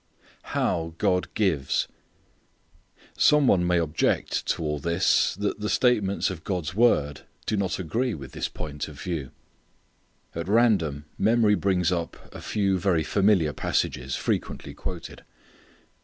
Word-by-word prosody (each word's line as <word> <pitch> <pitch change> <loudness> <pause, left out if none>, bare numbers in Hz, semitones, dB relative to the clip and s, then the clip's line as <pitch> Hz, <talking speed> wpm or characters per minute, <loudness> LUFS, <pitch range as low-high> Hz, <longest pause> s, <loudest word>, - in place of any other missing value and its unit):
How 80 -1 0
God 90 +1 +1
Gives. 80 -11 +1 1.3
Some 150 -1 +5
one 90 -7 +3
may 90 0 +3
object 80 -1 0
to - - -1
all 75 -1 -1
this 85 +5 +2
that 100 +2 -2
the 105 0 -2
statements 105 -6 +2
of 85 -3 -8
God's 90 -4 -3
word 75 -10 +2 0.2
do - - 0
not 100 -3 -1
agree 115 +6 -1
with 70 -3 -9
this - - -3
point 75 -1 -5
of 75 -2 -11
view. 80 -7 -4 1.0
At 85 +1 -4
random 95 -10 +2
memory 110 -2 +4
brings 95 -4 +1
up 85 -2 -2 0.2
a - - -8
few 100 -3 0
very 85 -3 +2
familiar 95 -4 +2
passages, 65 0 -1
frequently - - -3
quoted. - - -7
90 Hz, 135 wpm, -26 LUFS, 80-105 Hz, 1.3 s, Some